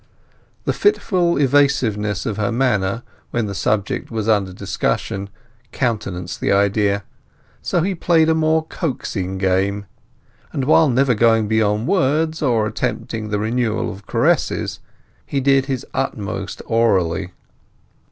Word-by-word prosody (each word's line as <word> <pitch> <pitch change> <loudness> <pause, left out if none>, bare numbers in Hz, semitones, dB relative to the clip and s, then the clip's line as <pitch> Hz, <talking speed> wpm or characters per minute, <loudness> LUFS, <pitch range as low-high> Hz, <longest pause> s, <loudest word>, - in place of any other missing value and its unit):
The - - 0
fitful 185 - +2
evasiveness 125 -8 +2
of 105 -2 -2
her 105 +1 0
manner 115 -3 0 0.3
when 120 -2 -1
the 100 - -4
subject 100 +1 -1
was 110 -2 -3
under 100 -4 +2
discussion 95 +1 -2 0.4
countenanced 100 -8 -3
the - - +1
idea. 100 0 +2 0.6
So 175 - 0
he 195 +2 0
played 165 -2 +3
a 160 - +4
more 160 0 +2
coaxing 100 - -3
game; 95 +2 0 0.7
and 135 - -2
while 155 +1 +5
never 130 +1 +3
going 115 -1 +3
beyond 110 +1 +1
words, 160 -3 +1
or 120 -7 +2
attempting 110 0 -3
the 105 - 0
renewal 110 +1 -1
of 100 +1 -14
caresses, - - +1 0.4
he 140 - -2
did 135 0 +3
his 135 -2 -3
utmost 105 -6 -3
orally. 95 -6 +1
110 Hz, 130 wpm, -20 LUFS, 100-135 Hz, 0.7 s, while